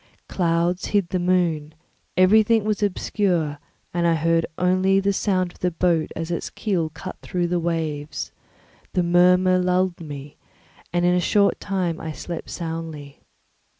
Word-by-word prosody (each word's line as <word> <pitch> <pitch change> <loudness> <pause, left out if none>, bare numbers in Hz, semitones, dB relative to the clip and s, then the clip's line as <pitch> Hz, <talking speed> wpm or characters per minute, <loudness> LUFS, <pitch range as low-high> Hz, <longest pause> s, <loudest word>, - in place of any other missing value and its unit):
Clouds 170 0 0
hid 200 -4 +1
the 185 - -1
moon, 170 -4 0 0.4
everything 215 +4 +5
was 215 -1 -1
obscure, 180 -6 0 0.3
and 170 0 +1
I 165 - +3
heard 165 +1 +1
only 185 +2 +3
the 200 +1 +1
sound 185 -3 0
of - - -21
the 180 - +1
boat 170 -2 +1
as 165 +1 -4
its 170 - -3
keel 180 -7 -1
cut 165 +4 -8
through 175 -1 -2
the 175 0 +1
waves; 160 -3 -3 0.6
the 180 - +2
murmur 180 +1 +4
lulled 180 -1 +1
me, 145 -2 -8 0.5
and 175 +1 +1
in 180 - +4
a 180 - +2
short 200 +3 +2
time 185 -4 -2
I 160 -1 -5
slept 170 +2 -6
soundly. 160 -4 -6
175 Hz, 150 wpm, -23 LUFS, 165-185 Hz, 0.6 s, everything